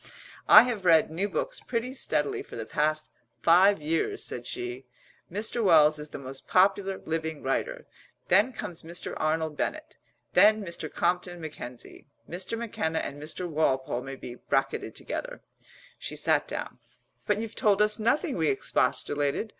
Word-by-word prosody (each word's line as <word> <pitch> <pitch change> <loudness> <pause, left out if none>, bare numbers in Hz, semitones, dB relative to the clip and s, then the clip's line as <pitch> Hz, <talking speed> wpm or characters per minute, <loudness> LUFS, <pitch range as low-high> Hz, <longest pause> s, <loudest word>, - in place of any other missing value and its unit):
"I - - +10
have 235 -6 -3
read 165 -3 +5
new 190 +6 -1
books - - -2
pretty 250 +1 -3
steadily 150 - -1
for - - -11
the 115 - -5
past 155 +3 -1 0.3
five 190 +4 +6
years," 160 +2 -1
said 120 - -5
she. 120 +1 -5 0.4
"Mr. 220 +4 -1
Wells 155 -5 +5
is 150 0 -7
the - - -7
most 135 0 -7
popular 195 +1 +3
living 160 -1 -4
writer; 135 - -2 0.4
then 205 +8 +4
comes 175 -8 -6
Mr. 170 +2 -6
Arnold 155 0 0
Bennett; 310 - -4 0.4
then 215 +1 +6
Mr. 170 -3 -5
Compton 175 0 -1
Mackenzie; 145 -8 -9 0.2
Mr. 185 +6 -4
McKenna 185 -8 -2
and 145 -1 -4
Mr. 160 +4 -3
Walpole 135 -6 0
may 135 +1 -7
be 125 - -8
bracketed 135 +2 -2
together." - - -5 0.6
She - - -5
sat - - +1
down. - - -6 0.5
"But 210 - +2
you've 225 0 -5
told 205 -2 +2
us 210 +1 +3
nothing!" 235 +7 +1
we - - +2
expostulated. 145 - 0
170 Hz, 155 wpm, -28 LUFS, 150-210 Hz, 0.6 s, I